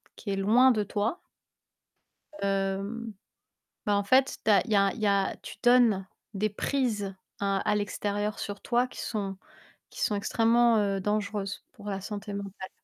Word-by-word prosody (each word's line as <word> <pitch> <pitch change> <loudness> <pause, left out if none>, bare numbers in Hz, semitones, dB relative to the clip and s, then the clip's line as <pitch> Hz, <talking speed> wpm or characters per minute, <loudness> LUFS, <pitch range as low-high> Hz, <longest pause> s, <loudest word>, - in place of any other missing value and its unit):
qui 200 - -5
est - - 0
loin 230 +7 +5
de 215 -3 +1
toi 210 - -2 1.2
hem, 195 +3 -1 0.7
bah 205 -1 +2
en 200 - +1
fait, 260 +6 +3
tu 220 - +3
as 200 -3 +6
il 225 - -6
y - - +4
a 195 -1 +4
il - - -9
y 215 - +1
a 200 -1 +2
tu - - -9
donnes 235 -6 +5 0.3
des 210 +2 0
prises 210 -4 -1 0.2
à 200 -1 +1
à 210 -1 +1
l'extérieur 205 0 -2
sur 205 0 -5
toi 245 +1 +1
qui - - -8
sont 195 -4 -3 0.5
qui - - -10
sont 210 - +2
extrêmement, 230 +2 +3
heu, 200 -1 +1
dangereuses 205 0 -2
pour 205 - -10
la 195 -1 -2
santé 205 +1 -6
mentale. 200 -1 -6
205 Hz, 175 wpm, -28 LUFS, 195-225 Hz, 1.2 s, as